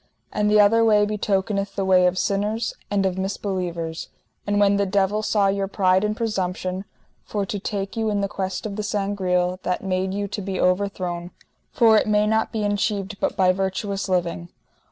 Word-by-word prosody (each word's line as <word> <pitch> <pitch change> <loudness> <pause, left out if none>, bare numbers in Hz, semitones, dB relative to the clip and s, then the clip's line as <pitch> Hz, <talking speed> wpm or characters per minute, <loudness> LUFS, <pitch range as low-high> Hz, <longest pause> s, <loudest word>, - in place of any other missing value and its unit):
And 210 0 +1
the 210 0 +5
other 220 +3 +5
way 210 -2 +4
betokeneth 200 -1 -1
the 195 - -1
way 185 -1 +5
of 180 +1 0
sinners 210 +4 -1 0.2
and 200 -1 +1
of 190 0 -1
misbelievers. 180 -4 -3 0.4
And 205 0 +1
when 200 0 +4
the 200 0 +1
devil 200 +2 +1
saw 210 -1 +2
your 195 0 +1
pride 190 -1 +2
and 210 +1 -1
presumption, 190 -3 -2 0.4
for 205 -2 -3
to 205 +1 -4
take 195 0 -4
you 225 -1 0
in 205 -1 0
the 200 - 0
quest 190 0 -4
of 205 -1 -4
the - - -1
Sangreal, 185 -3 0
that 180 0 -2
made 190 0 -1
you 200 +1 -2
to 205 +1 -5
be 190 -1 -4
overthrown, 180 -2 0 0.4
for 225 -2 +5
it - - -2
may 210 0 +3
not 220 +1 +1
be 220 -2 -2
enchieved 205 0 -1
but - - -1
by 185 -1 +5
virtuous 195 +1 -2
living. 175 -1 -1
195 Hz, 190 wpm, -23 LUFS, 185-210 Hz, 0.4 s, the